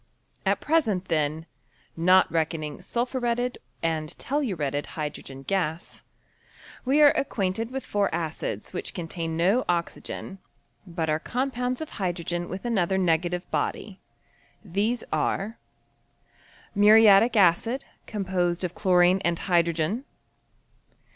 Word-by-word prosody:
At - - +2
present, 220 - +1
then, 155 0 0 0.5
(not 185 +3 +4
reckoning 160 -1 -2
sulphuretted 245 +3 -1 0.2
and 160 -2 -1
telluretted 175 - -1
hydn^en 140 -3 -6
gas), 175 -4 -2 0.8
we 280 +4 +4
are 290 - +8
acquainted 225 -3 -1
with 265 +1 -5
four 205 -1 +1
acids 160 -10 -4
which - - -4
con 170 -2 -4
tain 165 -1 -4
no 195 +9 +3
oxygen, 175 +2 -3 0.5
but 165 -2 -3
are 155 0 +1
compounds 250 - -2
of 315 - -5
hydrogen 175 -1 -2
with 190 +5 -6
another 195 -5 +1
negative 175 0 +1
body. 200 -3 -2 0.7
These 210 +6 -1
are 215 +4 -1 1.1
Muriatic 215 +2 +6
acid, 205 +8 +3 0.2
composedofchlorineand 180 -1 +1
hydrogen. 170 - +1
185 Hz, 100 wpm, -26 LUFS, 165-225 Hz, 1.1 s, are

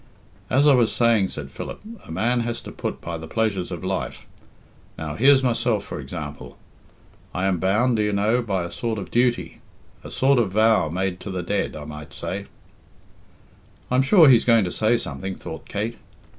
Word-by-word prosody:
"As 135 +5 +3
I 145 - +7
was 120 -4 +3
saying," 115 -5 +3
said 70 -6 -7
Philip, - - -7 0.3
"a - - -9
man 120 +2 +1
has 120 0 -2
to - - -9
put - - -5
by 85 -1 -5
the 80 - -8
pleasures 105 -3 -1
of - - -6
life. - - -3 0.7
Now 80 -2 -4
here's 135 - +5
myself, 120 -4 +1
for - - -7
example. 75 +1 -7 0.8
I 90 - 0
am 95 -3 +1
bound, 110 +7 +2
do - - +1
you 105 0 +1
know, 105 +5 +2
by 100 -6 -1
a 85 - -6
kind 115 -2 -3
of 95 -3 -6
duty 120 0 0 0.4
a - - -8
sort 135 0 +3
of 100 -5 0
vow 110 -6 +3
made 90 +2 -2
to - - -8
the 95 -2 -3
dead, 100 +3 -1
I 75 -1 -7
might 75 -1 -9
say 100 +2 -5 0.7
" - - -30
"I'm 125 +1 +4
sure 160 +4 +6
he's 125 -4 +6
going 115 -3 +4
to 90 - -3
say 115 +2 +2
something," 95 +3 -5
thought - - -9
Kate. 110 +3 -3
105 Hz, 195 wpm, -23 LUFS, 90-120 Hz, 0.8 s, I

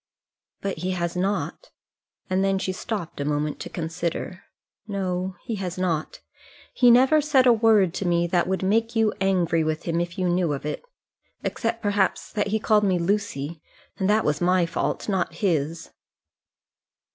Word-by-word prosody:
"But 195 -5 -3
he 185 +2 -1
has 170 -1 -2
not." 180 -4 -2 0.6
And 185 0 +1
then 195 0 +2
she 190 - -2
stopped 185 -5 -5
a - - 0
moment 150 +1 -1
to - - -6
consider. 170 +2 -4 0.4
"No, 185 -2 -2
he 225 - -4
has 185 -2 -4
not. 170 -4 -2 0.5
He 245 - +5
never 265 +6 +6
said 280 -3 +3
a 245 - +7
word 215 -6 +4
to 185 - -2
me 170 0 +2
that 175 0 +1
would 190 0 -1
make 225 +4 +1
you 220 -1 +3
angry 175 -4 +2
with 155 0 -2
him 170 0 0
if 175 0 -5
you 185 -1 0
knew 175 -3 +1
of 140 - -5
it. 150 - -3 0.6
Except, 230 0 -2
perhaps, 205 -2 0
that 205 -2 0
he 220 +2 0
called 210 -1 +3
me 190 -3 +2
Lucy; 170 -5 -2 0.4
and 190 0 +1
that 215 +1 +3
was 150 0 0
my 180 0 +3
fault, 165 - -2
not 185 -5 -1
his." 165 -3 -1
185 Hz, 170 wpm, -24 LUFS, 170-205 Hz, 0.6 s, a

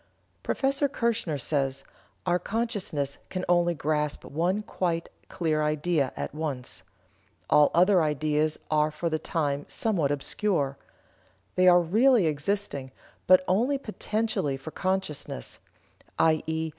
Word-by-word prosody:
Prof. - - -4 0.3
Kirchener 230 - -1
says: 135 -1 -1 0.4
"Our 175 0 +2
consciousness 195 - -2
can 185 -1 -3
only 175 -1 +3
grasp 150 -1 -1
one 180 +8 -1
quite 170 -4 -2 0.2
clear 155 -3 0
idea 150 -1 +1
at - - -4
once. 145 -5 -4 0.7
All 150 -1 +6
other 180 +1 +5
ideas 150 0 +1
are 150 0 +3
for 155 +2 -3
the 155 - 0
time 145 -4 -1
somewhat 185 -11 0
obscure. 145 0 0 0.8
They 185 0 +3
are 180 0 +8
really 225 +4 +4
existing, 150 -2 -1 0.4
but 185 0 +7
only 240 +10 +2
potentially 215 - -2
for 135 +4 -9
consciousness, 185 - -3 0.6
_i.e. 160 0 +1
160 Hz, 120 wpm, -27 LUFS, 150-185 Hz, 0.8 s, are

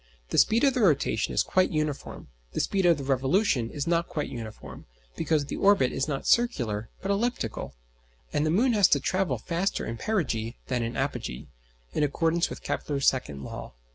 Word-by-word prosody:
The - - +2
speed 225 +3 +4
of 275 -2 +5
the 255 - -1
rotation 145 - +2
is - - +2
quite 185 0 +2
uniform, 155 - -3 0.2
the - - -2
speed 195 -3 +1
of 170 -3 +5
the 140 - -5
revolution 135 - +1
is 145 +1 -4
not 170 0 +1
quite 150 - -3
uniform, 110 - -8 0.3
because 155 -3 +1
the - - -5
orbit 195 -11 +4
is 135 - -1
not 140 -3 -3
circular 120 - +1
but 195 - 0
elliptical, 200 - -2 0.6
and 145 - +1
the 155 - +1
moon 235 +10 +3
has 205 -4 +6
to 140 - +3
travel 185 +6 0
faster 175 +3 -2
in 115 - -4
perigee 125 - -1
than 125 -2 0
in 115 +1 -3
apogee 120 - -3 0.4
(in - - 0
accordance 165 +4 +1
with - - -8
Kepler's 140 -2 -1
second 75 - 0
law). - - -7
150 Hz, 185 wpm, -27 LUFS, 125-190 Hz, 0.6 s, has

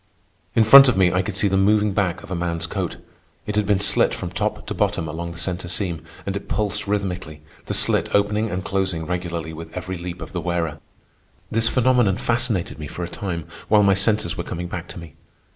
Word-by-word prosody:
In 115 - +5
front 135 +5 +10
of 125 - +2
me 90 -2 +4
I 90 - +2
could 100 +3 -5
see 105 - +3
the 95 0 +1
moving 105 +1 +3
back 95 -1 -1
of - - -11
a - - -1
man's 85 -1 -2
coat. 80 - -3 0.5
It 105 - -3
had 105 -1 +1
been 100 -2 +3
slit 100 - +3
from - - -5
top - - -2
to - - -4
bottom 80 - 0
along 85 +3 -5
the 85 - -10
centre 90 +1 -2
seam, 85 -3 -2 0.2
and 100 - -3
it 100 - -5
pulsed 105 -1 -1
rhythmically, 90 -7 -3 0.2
the - - 0
slit - - +3
opening 105 +2 +1
and 95 +1 -4
closing 95 -5 -1
regularly 85 -2 -4
with 80 +1 -9
every 90 0 -5
leap 85 0 -6
of - - -8
the 90 - -3
wearer. 85 -3 -2 0.7
This 115 0 +2
phenomenon 125 -6 +3
fascinated 115 -9 -1
me 75 - -5
for 90 - -6
a - - -3
time, 85 -4 -4 0.2
while 105 -1 +5
my 100 -1 +5
senses 100 -2 +1
were - - -4
coming 90 +1 -5
back 85 0 -6
to - - -10
me. 85 -4 -11
95 Hz, 220 wpm, -22 LUFS, 85-105 Hz, 0.7 s, front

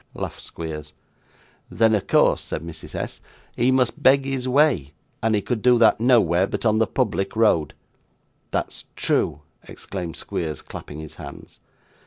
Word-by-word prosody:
laughed - - -5
Squeers. 75 -2 -7 0.8
'Then, 110 -1 +3
of 105 - 0
course,' - - +4
said 80 - -5
Mrs. 85 -1 -9
S., - - -5 0.3
'he 120 +2 +2
must 130 +3 +1
beg 135 0 +5
his 135 -2 -2
way, 130 - +2 0.3
and 110 0 +2
he 105 - 0
could 120 -4 -2
do 125 +1 +5
that, 115 -2 +5
nowhere, 100 -7 +4
but - - -4
on 110 0 +3
the 110 - +3
public 100 -6 -1
road.' 105 -9 +2 0.7
'That's - - -3
true,' 75 - 0 0.3
exclaimed 90 -4 -6
Squeers, 80 -4 -4
clapping 75 - -9
his 80 -1 -9
hands. - - -11
110 Hz, 155 wpm, -23 LUFS, 85-125 Hz, 0.8 s, beg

